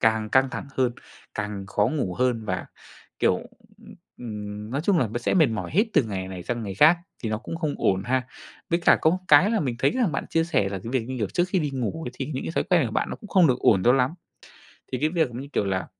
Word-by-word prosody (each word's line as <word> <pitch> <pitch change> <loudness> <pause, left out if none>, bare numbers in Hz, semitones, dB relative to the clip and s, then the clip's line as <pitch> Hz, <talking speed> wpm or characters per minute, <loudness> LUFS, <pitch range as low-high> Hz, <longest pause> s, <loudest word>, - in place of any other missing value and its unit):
càng 110 -1 +2
căng 130 0 +3
thẳng - - -5
hơn, 125 -2 +2 0.4
càng 105 -2 -4
khó 105 +1 +1
ngủ 125 -10 -2
hơn 125 -2 0
mà, 95 -1 -2 0.5
kiểu, - - +3 0.4
ừm, - - -14 0.2
ừm, 105 -2 -7
nói 135 +3 -1
chung 195 -4 +3
là 125 - +2
b 110 - -6
sẽ 120 - 0
mệt 160 -5 +5
mỏi 105 -7 -4
hết 205 +8 +3
từ - - +4
ngày 95 -5 -4
này 95 -2 -7
sang 120 +4 -3
ngày 100 -2 -5
khác, 160 - +6 0.2
thì 115 - -2
nó 110 - -1
cũng 125 +8 -6
không 155 -3 -2
ổn 95 0 +1
ha. 130 0 0 0.4
Với 170 - +3
cả 170 - +5
có 160 - +5
một 180 - 0
cái 165 +8 +7
là 225 - +1
mình 130 -5 -1
thấy - - +3
rằng 240 - 0
bạn 135 - -2
chia 165 0 +2
sẻ 165 -10 +1
là 100 0 -4
cái 115 +5 -7
việc, 130 -3 +1
như 130 - -4
kiểu, 105 -4 -1
trước 175 - 0
khi 185 - +1
đi 150 -3 -1
ngủ 135 +5 -3
ấy, - - -7
thì - - -4
những 130 - -3
cái - - -4
thói - - +1
quen 170 -8 +3
của 110 - -6
bạn - - -1
nó - - -4
cũng 210 - -13
không 185 -4 +5
được 125 - +2
ổn 95 -4 +4
cho 120 - +6
lắm. 130 0 +2 0.8
Thì 130 - -1
cái 155 - +2
việc 165 -3 +1
giống 120 +1 -7
như 140 - -8
kiểu - - +1
là 95 -1 -1
125 Hz, 280 wpm, -25 LUFS, 105-155 Hz, 0.8 s, cái